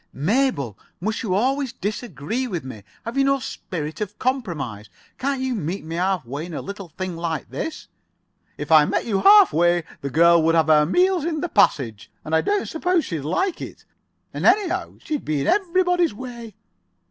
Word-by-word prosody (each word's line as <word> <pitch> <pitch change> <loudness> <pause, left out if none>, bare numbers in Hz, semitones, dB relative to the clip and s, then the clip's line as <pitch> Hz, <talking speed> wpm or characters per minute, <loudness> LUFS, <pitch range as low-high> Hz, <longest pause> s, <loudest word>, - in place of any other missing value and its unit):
"Mabel, 150 - 0 0.2
must 215 +5 -2
you 190 -5 -1
always 265 +4 0
disagree 215 - -4
with 180 -8 -4
me? 130 -5 -8 0.2
Have 235 +4 -2
you - - +4
no 275 0 +3
spirit 165 - -6
of 210 - -4
compromise? 155 - -3 0.3
Can't 275 0 -1
you 260 -1 -1
meet 190 -3 -4
me 165 - -6
half 185 -3 0
way 140 +7 -5
in 170 - -7
a - - -4
little 200 -2 -7
thing 185 +2 -5
like 165 -1 -4
this?" 320 -1 -5 0.7
"If 150 +2 -6
I 155 -2 +8
met - - -1
you 200 -4 0
half 405 -1 +7
way 175 +1 +3 0.2
the 140 - -3
girl 170 +3 +5
would 165 +1 +3
have 160 -1 +3
her 150 -1 +5
meals 360 - +2
in 315 -2 -2
the 350 - -2
passage. 130 - +1 0.2
And 155 - -5
I 160 - +4
don't 410 -1 0
suppose 355 +1 0
she'd 165 -4 -4
like 330 - -1
it, - - -9 0.5
and - - -5
anyhow 380 0 +2
she'd 300 -3 -3
be 155 -2 -1
in - - -2
everybody's 360 - +2
way." 235 -3 -8
200 Hz, 190 wpm, -22 LUFS, -, 0.7 s, I